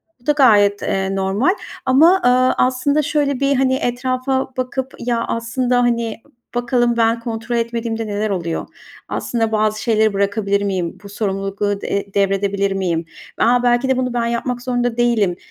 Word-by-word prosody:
gayet 330 -7 -39
bu - - -26
da 295 - +4
gayet, 205 -8 +4
eee, 195 0 -1
normal. 200 - +1 0.3
Ama, 330 +9 +5
ııı, 255 +1 +4
aslında 260 +4 +2
şöyle 280 -2 0
bir, 275 -1 +2
hani, 260 0 +2
etrafa 255 +1 -1
bakıp, 260 +1 -3
"Ya, 235 -1 -1
aslında, 245 +2 0
hani, 235 -2 -1 0.3
bakalım 240 -1 +1
ben 230 0 +2
kontrol 230 0 -4
etmediğimde 230 -1 -2
neler 210 +1 -2
oluyor, 170 -4 -3 0.4
aslında 225 -2 -2
bazı 215 0 0
şeyleri 220 -2 +2
bırakabilir 200 0 0
miyim, 185 -4 -2
bu - - -8
sorumlulukları, 200 0 -2
eee, 200 0 -3
devredebilir 200 0 +1
miyim?" 175 -4 -1 0.3
"A, 245 +1 +3
belki 245 +2 +2
de 265 - +2
bunu 255 -1 -1
ben 235 -1 0
yapmak 240 +1 -2
zorunda 245 -2 -1
değilim," 225 -7 +2
235 Hz, 160 wpm, -19 LUFS, 200-255 Hz, 0.4 s, Ama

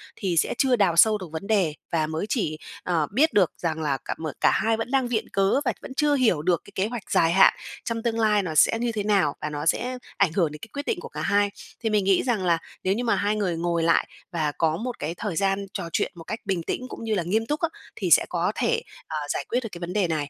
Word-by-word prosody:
thì 180 -5 -2
sẽ - - +2
chưa 260 -2 +3
đào 195 -7 +2
sâu 215 +5 +6
được 185 - -8
vấn 165 +5 -6
đề, 195 -8 +2 0.2
và 160 -2 +1
mới 160 +5 -3
chỉ, 175 - -1 0.3
ờ, 165 -4 0
biết 305 +8 +3
được 190 -5 +4
rằng 160 -2 -2
là 140 -3 0
cả - - -3
mở 155 -2 -4
cả - - +5
hai 225 0 +1
vẫn 225 +2 -4
đang 265 -2 +2
viện 235 -3 -2
cớ 195 +6 +3
và - - +1
vẫn 260 - -8
chưa 295 +1 +2
hiểu 225 - +2
được 175 +1 +1
cái - - -14
kế 190 +3 +1
hoạch 235 -4 -7
dài 165 0 +4
hạn 190 +2 +6 0.3
trong 230 -1 -3
tương 230 -1 0
lai 210 -2 +3
nó 160 -3 -4
sẽ 225 +10 +5
như 240 0 0
thế 215 -2 -2
nào, 195 -8 +2
và 150 - -2
nó 150 0 -4
sẽ 250 +9 0 0.2
ảnh 195 -5 +3
hưởng 170 -5 +1
đến 150 - -9
cái 225 - -10
quyết 285 +1 -4
định 430 -6 -1
của - - -8
cả - - -6
hai. 205 0 +2 0.3
Thì 225 - -1
mình 210 -2 +2
nghĩ 195 -2 +3
rằng 230 -7 0
là 170 -2 +3 0.3
nếu 190 - +2
như 240 - -2
mà 230 - +2
hai 205 +1 +1
người 190 -5 0
ngồi 170 0 0
lại 165 0 +3 0.2
và 155 -3 0
có 160 -1 +1
một 245 +3 -5
cái 165 +3 -3
thời 205 -6 -3
gian 195 +3 +1
trò 175 -4 -4
chuyện - - 0
một 165 - -10
cách 215 +7 -5
bình 190 -4 -1
tĩnh 255 +9 -3
cũng - - -8
như 220 -1 0
là 180 - 0
nghiêm 215 +6 0
túc 295 +7 -2
á, 335 - +1 0.3
thì - - -2
sẽ - - +7
có - - 0
thể, 465 -1 +1 0.3
ờ, 155 - -3
giải - - -2
quyết 245 - +1
được 225 - -5
cái 170 - -8
vấn 175 +1 -5
đề 205 -4 +2
này. 155 -3 -2
195 Hz, 285 wpm, -25 LUFS, 165-225 Hz, 0.3 s, sẽ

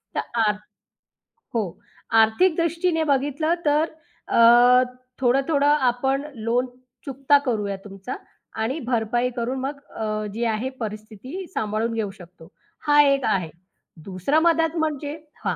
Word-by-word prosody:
तर - - +1 0.3
आर 210 -1 +2 1.0
हो, 230 -2 +1 0.6
आर्थिकदृष्टीने 335 +7 +2
बघितलं, 290 +4 0
तर 300 +2 +2 0.4
अ, 240 +2 +7 0.4
थोडं-थोडं 275 +3 +2 0.2
आपण 265 +3 -1
लोन 235 +2 0 0.4
चुकता 275 +1 +3
करूया 210 -5 -1
तुमचा 195 +4 -7 0.5
आणि 255 +8 -1
भरपाई 240 0 0
करून 250 +2 -2
मग 280 +2 -4 0.2
अ, 215 -1 -2
जी 230 +2 -3
आहे 225 +3 -1
परिस्थिती 220 - -7
सांभाळून 215 +2 -1
घेऊ 220 -3 -2
शकतो, 180 -4 -15 0.4
हा 295 0 +7
एक 275 -1 +2
आहे. 190 -6 0 0.6
दुसरा 195 - +1
मदत 325 0 +2
म्हणजे 300 -1 -2 0.3
हां - - 0
250 Hz, 120 wpm, -23 LUFS, 220-290 Hz, 1.0 s, अ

